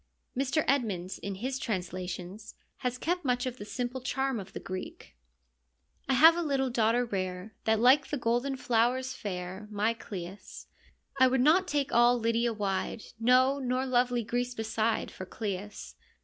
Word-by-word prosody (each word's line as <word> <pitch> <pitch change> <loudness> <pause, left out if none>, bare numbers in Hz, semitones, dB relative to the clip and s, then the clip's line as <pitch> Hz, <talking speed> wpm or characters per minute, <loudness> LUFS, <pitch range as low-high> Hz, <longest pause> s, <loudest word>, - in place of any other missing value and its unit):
Mr. 275 +4 +1
Edmonds, 205 -10 0
in 200 -1 -5
his 260 +6 -3
translations, 185 0 -5 0.2
has 250 0 -2
kept 350 +6 -1
much 250 -2 0
of 255 -1 -4
the 205 - -6
simple 250 +3 -4
charm 265 -1 -1
of 190 - -9
the - - -5
Greek: 185 0 -7 0.9
I - - +4
have 320 +5 +8
a 345 - -1
little 270 -5 0
daughter 235 +1 +2
rare, 185 -1 -4
That's 220 -1 +3
like 265 +4 +5
the 295 - -2
golden 245 +3 0
flowers 250 +2 +1
fair, 185 +1 -6
My 215 +2 +1
Cleis. 190 -3 -8 0.5
I 260 - +7
would 260 +1 +1
not 340 +7 +4
take 285 -4 -1
all 240 +1 +5
Lydia 230 +1 +1
wide, 205 0 -2 0.2
No, 255 +4 +4
nor 255 0 -1
lovely 245 -2 +1
Greece 245 +3 -2
beside, 220 0 -1
For 185 - -8
Cleis. 205 0 -5
240 Hz, 160 wpm, -29 LUFS, 205-260 Hz, 0.9 s, have